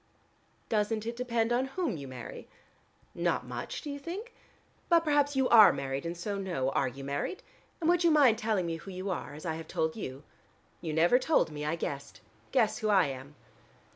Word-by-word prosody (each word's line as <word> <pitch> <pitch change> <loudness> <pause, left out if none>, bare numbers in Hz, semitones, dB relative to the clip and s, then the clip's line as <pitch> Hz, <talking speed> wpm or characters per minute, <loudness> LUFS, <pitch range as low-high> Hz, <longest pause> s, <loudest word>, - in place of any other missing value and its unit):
"Doesn't 215 0 0
it 235 +1 -3
depend 235 -2 0
upon 250 +2 +2
whom 305 - -2
you 140 -3 -7
marry?" 130 -2 -8 0.7
"Not - - 0
much, - - -5
do 295 - -4
you 285 - -5
think? 395 - -6 0.6
But 340 -1 +6
perhaps 290 -2 +2
you 265 -1 +3
are 220 -3 +9
married, 135 +2 -3
and 170 +1 -4
so 200 +3 -3
know. 170 -9 -1
Are 135 - +1
you 135 +2 -7
married? 140 - -3 0.4
And 320 - -1
would 350 0 +4
you 340 - +5
mind 275 -8 +5
telling 215 -6 0
me 165 -1 -2
who 195 - -11
you 185 +1 -4
are, 145 -4 -5
as 155 - -10
I 160 - -1
have 160 -1 -8
told 160 0 -1
you?" 135 -9 -6 0.6
"You 160 - -3
never 170 +10 +4
told 285 - +2
me: 150 0 -5
I 155 +2 0
guessed. 140 -4 -5 0.3
Guess 220 +1 +2
who 215 -2 -1
I 190 -4 +5
am." 135 +2 -8
205 Hz, 200 wpm, -30 LUFS, 155-255 Hz, 0.7 s, are